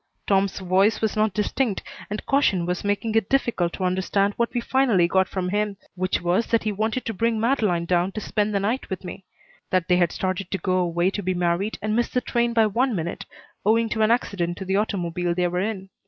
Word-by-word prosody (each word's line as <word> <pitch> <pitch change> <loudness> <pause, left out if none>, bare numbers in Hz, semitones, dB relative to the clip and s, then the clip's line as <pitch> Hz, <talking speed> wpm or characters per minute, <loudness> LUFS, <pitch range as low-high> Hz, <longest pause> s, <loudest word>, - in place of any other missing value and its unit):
Tom's 195 -1 +1
voice 190 +3 +2
was 220 -1 -1
not 215 0 +2
distinct 210 +2 -1 0.3
and 210 +1 -5
caution 200 -11 +2
was 180 0 -2
making 205 +2 -1
it 220 -3 +1
difficult 235 -10 +1
to 190 - -4
understand 190 +2 +1
what 235 0 0
we 245 - -1
finally 235 -8 +2
got 190 +1 +2
from 185 -2 -2
him, 205 0 -1 0.2
which 185 0 -1
was 180 +6 +1
that 230 - +1
he 215 - 0
wanted 220 +4 -2
to 225 - -2
bring 225 +2 0
Madeleine 215 -8 +1
down 175 +2 +1
to - - -3
spend 210 0 -1
the 200 - +1
night 225 +7 -2
with 190 -2 -4
me; 190 +1 -8 0.4
that 185 -2 +1
they 180 -2 +4
had 175 -2 +2
started 185 0 -3
to 195 - -1
go 185 -1 0
away 175 +1 +1
to 205 - -3
be 185 -1 -1
married 175 +4 0
and 215 0 0
missed 240 +2 0
the 250 - +3
train 235 0 0
by 225 -1 +4
one 235 +3 +1
minute, 170 -1 -4 0.4
owing 225 +2 +3
to 220 0 -1
an 215 - +4
accident 185 -7 0
to 190 - -6
the 190 +1 0
automobile 175 -4 -1
they 180 0 +1
were 180 +1 -2
in. 195 -2 -4
200 Hz, 230 wpm, -24 LUFS, 180-220 Hz, 0.4 s, they